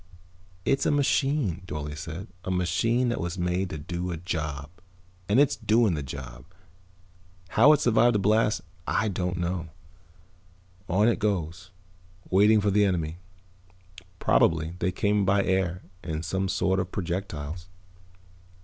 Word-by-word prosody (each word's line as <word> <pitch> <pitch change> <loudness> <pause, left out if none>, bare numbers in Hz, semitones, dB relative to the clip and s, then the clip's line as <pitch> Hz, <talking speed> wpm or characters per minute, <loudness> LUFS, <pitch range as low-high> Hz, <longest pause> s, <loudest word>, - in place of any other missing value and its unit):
"It's 135 - +2
a - - +3
machine," 140 - +1
Dorle 75 -2 -5
said. 80 +4 -6 0.2
"A - - -5
machine 95 +8 +1
that 120 - -2
was 85 +2 -3
made 90 +1 -1
to 80 - -5
do 85 +4 -4
a 85 - -3
job. 75 -4 -4 0.6
And 105 +6 +4
it's 145 -2 +4
doing 110 -3 +2
the 75 - -2
job. 65 -3 -8 1.1
How 135 +7 +6
it 150 - +1
survived 120 -1 +4
the - - +3
blast 105 -1 +2 0.3
I 110 - +1
don't 90 -2 -2
know. 85 -1 -2 1.2
On 105 +5 +3
it 120 - +2
goes, 90 -3 -2 0.6
waiting 105 +3 +5
for 100 0 +1
the 105 +1 +4
enemy. 85 -4 -1 1.0
Probably 80 -2 +2
they 90 - 0
came 105 +2 +1
by 100 +1 +3
air 95 -1 0 0.2
in 80 -2 -4
some 95 +2 -1
sort 95 0 +1
of 95 -1 -3
projectiles." 85 -3 -4
95 Hz, 140 wpm, -26 LUFS, 85-105 Hz, 1.2 s, How